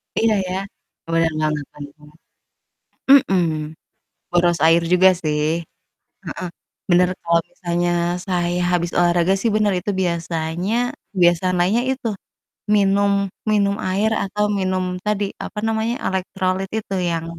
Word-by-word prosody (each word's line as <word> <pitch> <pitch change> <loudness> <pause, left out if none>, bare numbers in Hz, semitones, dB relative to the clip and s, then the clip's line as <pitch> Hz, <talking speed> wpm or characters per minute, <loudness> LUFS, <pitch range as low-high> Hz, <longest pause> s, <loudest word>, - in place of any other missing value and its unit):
Iya, 225 -1 +3
ya. 180 - -3 0.6
Bener 165 0 +2
banget 155 -1 0
bener 145 -1 -9
banget, 150 +1 -19 0.9
mhm. 195 -11 +5 0.9
Nguras 175 -1 +2
air 165 +1 +5
juga, 185 +1 +6
sih. 155 +2 0
Heeh, 165 - -26 1.1
bener, 180 0 +4
kalo 170 0 +2
misalnya 175 -1 -1 0.4
saya 175 -3 0 0.2
habis 175 -1 0
olahraga 175 +1 +3
sih, 230 - +1
bener, 210 -2 +2
itu 195 +3 -3
biasanya 170 +2 -2 0.4
kebiasaan 180 0 +3
lainnya 195 +7 +2
itu 260 -3 -3 0.7
minum 200 0 +3 0.4
minum 200 -1 +2
air, 200 +4 +1
atau 210 +2 -1
minum 185 -1 0 0.2
tadi, 210 -1 +1 0.2
apa 210 - -7
namanya, 225 +1 0
elektrolit 190 0 -1
itu, 205 -2 -5 0.2
yang, 165 -1 -2
180 Hz, 125 wpm, -20 LUFS, 170-200 Hz, 1.1 s, juga